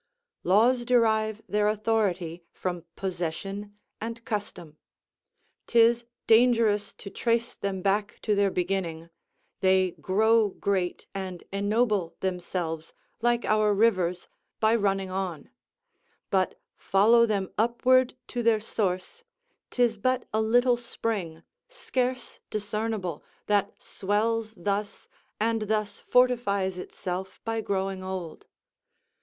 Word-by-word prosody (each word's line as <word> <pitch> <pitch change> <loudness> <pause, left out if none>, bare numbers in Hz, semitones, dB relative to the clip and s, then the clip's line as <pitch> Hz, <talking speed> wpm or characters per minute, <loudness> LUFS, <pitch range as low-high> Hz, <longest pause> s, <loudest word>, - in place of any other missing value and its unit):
Laws 235 +7 +4
derive 220 -3 +2
their 210 0 +1
authority 200 -6 0
from 175 -2 -4
possession 195 +3 -4 0.2
and 230 +1 -6
custom. 180 -7 -5 0.9
'Tis 235 0 +4 0.2
dangerous 225 -3 +4
to 200 - -10
trace 235 0 0
them 190 -2 -4
back 205 +1 0
to 215 - +2
their 200 -1 +3
beginning; 175 -3 -2 0.5
they 190 -1 +3
grow 220 +4 +2
great, 190 -2 -2
and 190 -3 -5
ennoble 205 -3 +1
themselves, 175 -3 -3 0.3
like 240 0 +2
our 215 -1 +3
rivers, 185 -5 +2 0.3
by 220 0 +4
running 195 -3 0
on; 185 -5 -4 0.8
but 190 -1 +1 0.2
follow 230 +4 +4
them 200 -3 -1
upward 245 +3 +3
to 245 - -3
their 230 -2 +3
source, 205 - -2 0.5
'tis 240 -3 +1
but 255 +4 0
a 220 - +2
little 245 +2 +3
spring, 205 -8 -4 0.2
scarce 255 - -3
discernable, 210 -4 -3 0.2
that 205 -1 +1
swells 220 +2 -1
thus, 200 +2 -3 0.3
and 225 +1 +1
thus 215 -1 -1
fortifies 205 -7 +2
itself 185 +1 -5
by 225 0 -1
growing 195 -2 -2
old. 185 -4 -6
205 Hz, 110 wpm, -27 LUFS, 190-230 Hz, 0.9 s, Laws